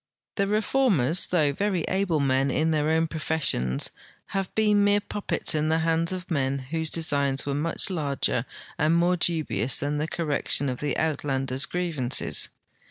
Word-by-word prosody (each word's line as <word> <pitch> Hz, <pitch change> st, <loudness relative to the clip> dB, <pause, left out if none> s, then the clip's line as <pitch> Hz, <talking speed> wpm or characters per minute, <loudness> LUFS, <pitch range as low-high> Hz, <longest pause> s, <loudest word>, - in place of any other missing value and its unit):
The 200 Hz, -1 st, 0 dB
Reformers, 205 Hz, -, +2 dB
though 155 Hz, -5 st, +2 dB
veiy 190 Hz, 0 st, -1 dB
able 185 Hz, -4 st, 0 dB
men 135 Hz, 0 st, +2 dB
in 160 Hz, +4 st, +1 dB
their 155 Hz, -1 st, +1 dB
own 160 Hz, +1 st, +2 dB
professions, 150 Hz, -, -1 dB, 0.4 s
have 195 Hz, -1 st, -2 dB
been 210 Hz, -2 st, +3 dB
mere 205 Hz, 0 st, +4 dB
puppets 205 Hz, -3 st, -3 dB
in 155 Hz, 0 st, 0 dB
the 160 Hz, -, +3 dB
hands 165 Hz, +1 st, +1 dB
of 185 Hz, -1 st, -6 dB
men 140 Hz, -3 st, 0 dB
whose 160 Hz, +4 st, -3 dB
designs 140 Hz, -4 st, 0 dB
were 140 Hz, -, -1 dB
much 165 Hz, +6 st, 0 dB
larger 140 Hz, -7 st, -1 dB, 0.3 s
and 155 Hz, +2 st, +3 dB
more 175 Hz, +1 st, +3 dB
dubious 155 Hz, -, +1 dB
than 145 Hz, +1 st, -1 dB
the 155 Hz, -, -1 dB
correction 145 Hz, -3 st, 0 dB
of 125 Hz, -, -4 dB
the 145 Hz, -3 st, -2 dB
Uitland 140 Hz, -4 st, -1 dB
ers' 135 Hz, +5 st, 0 dB
grievances. 160 Hz, -8 st, 0 dB
160 Hz, 165 wpm, -26 LUFS, 140-175 Hz, 0.4 s, mere